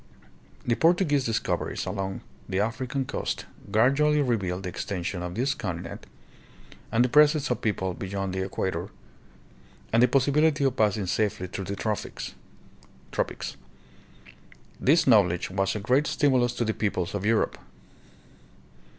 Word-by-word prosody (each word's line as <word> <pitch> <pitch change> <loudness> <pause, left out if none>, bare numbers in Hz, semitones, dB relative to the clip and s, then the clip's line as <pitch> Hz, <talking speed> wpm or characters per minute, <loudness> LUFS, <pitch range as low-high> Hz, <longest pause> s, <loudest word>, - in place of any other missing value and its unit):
The 120 - +2
Portuguese 160 -2 +3
discoveries 115 -1 -1
along 95 0 -3 0.3
the 95 0 0
African 130 +5 -1
coast - - -3 0.2
gradually 140 +8 +3
revealed 95 -7 -1
the 90 - -3
extension 90 0 -4
of 90 0 -5
this 130 +5 +1
continent 95 -9 -6 0.8
and 120 +2 +4
the - - +2
presence 150 +1 +4
of 125 - -1
people 95 -4 -1
beyond 95 +1 -4
the 95 0 -1
equator, 95 -1 -3 1.0
and 115 - +5
the 125 - +7
pos 135 +1 +3
sibility 150 0 +3
of 130 -2 +1
passing 105 -3 +1
safely 95 0 0
through 95 +1 -5
the 100 +2 -3
tropics. 105 0 -4 2.5
This 160 +4 +4
knowl 105 -8 +6
edge 90 +2 -3
was 95 +1 0
a - - -2
great 130 +8 +2
stimulus 130 -5 +2
to 120 - 0
the 110 - 0
peoples 100 -4 -2
of 100 -2 -3
Europe. 110 +1 +1
110 Hz, 140 wpm, -27 LUFS, 95-130 Hz, 2.5 s, the